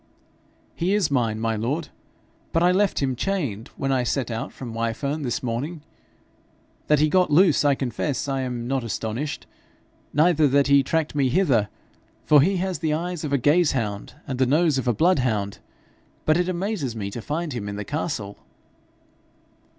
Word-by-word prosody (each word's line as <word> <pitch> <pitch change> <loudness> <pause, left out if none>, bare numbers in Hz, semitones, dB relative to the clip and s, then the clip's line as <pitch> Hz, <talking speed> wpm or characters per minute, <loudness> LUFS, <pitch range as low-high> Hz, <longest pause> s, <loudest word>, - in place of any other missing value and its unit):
'He 185 +4 0
is 205 -7 +1
mine, 115 -5 +1
my 115 0 0
lord, 140 +9 -2 0.6
but 165 - +3
I 180 - +5
left 190 -5 +1
him 130 -2 0
chained 140 - -2
when 135 - -1
I 130 -2 +2
set 125 0 -1
out 115 0 -4
from 120 -4 -8
Wyfern 115 +7 -2
this 125 -3 -2
morning. 140 +7 -3 1.0
That 150 - +4
he 150 +2 +3
got 180 +2 +3
loose 160 0 +4
I 145 -1 +4
confess 130 +2 -2
I 135 -1 -1
am 125 -2 -4
not 135 -1 -1
astonished, 115 +6 -4 0.7
neither 155 0 +4
that 140 +1 +3
he 140 -1 +5
tracked 160 +3 -1
me 140 -3 +2
hither, 125 - +2 0.6
for 150 -2 +6
he 190 +6 +2
has 185 -3 -2
the 155 -1 0
eyes 175 0 -4
of 150 - -3
a 140 - +3
gaze 150 +5 +3
hound, 105 -6 -3
and 130 -4 -4
the 130 - +3
nose 150 0 +3
of 130 - -4
a 120 - +3
bloodhound; 125 - +1 0.7
but 155 - +4
it 180 +1 +1
amazes 180 - -2
me 100 -3 -4
to 120 - -6
find 155 +4 -3
him 105 -4 -4
in 100 - -5
the 105 0 -5
castle.' 145 -10 -4
140 Hz, 180 wpm, -24 LUFS, 120-160 Hz, 1.0 s, for